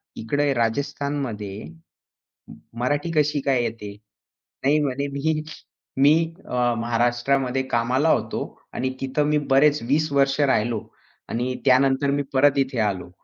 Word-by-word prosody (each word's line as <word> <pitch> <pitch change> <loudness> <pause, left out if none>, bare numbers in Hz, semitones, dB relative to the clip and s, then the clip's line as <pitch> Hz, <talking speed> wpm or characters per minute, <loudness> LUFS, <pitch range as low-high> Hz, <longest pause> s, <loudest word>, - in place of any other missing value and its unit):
इकडे 145 +5 0
राजस्थानमध्ये. 120 -4 -2 0.8
म - - -12 0.3
मराठी 145 +6 -1
कशी 150 -1 +2
काय 135 -2 +1
येते?" 110 -3 -5 0.7
नाही 145 +3 +4
म्हणे 140 0 -2
"मी 155 +2 0 0.6
मी 145 +2 +7 0.3
अ, 125 -1 0
महाराष्ट्रामध्ये 120 +3 0
कामाला 125 +6 +2
होतो - - 0 0.3
आणि 130 - -1
तिथे 135 +2 0
मी 150 +1 +2
बरेच 145 +2 +4
20 155 +3 +1
वर्ष 135 0 +2
राहिलो. 115 -6 +1 0.4
आणि 125 +2 -2
त्यानंतर 135 +1 +3
मी 145 0 0
परत 140 +1 +4
इथे 135 -2 -1
आलो." 100 -5 -1
135 Hz, 125 wpm, -23 LUFS, 120-145 Hz, 0.8 s, मी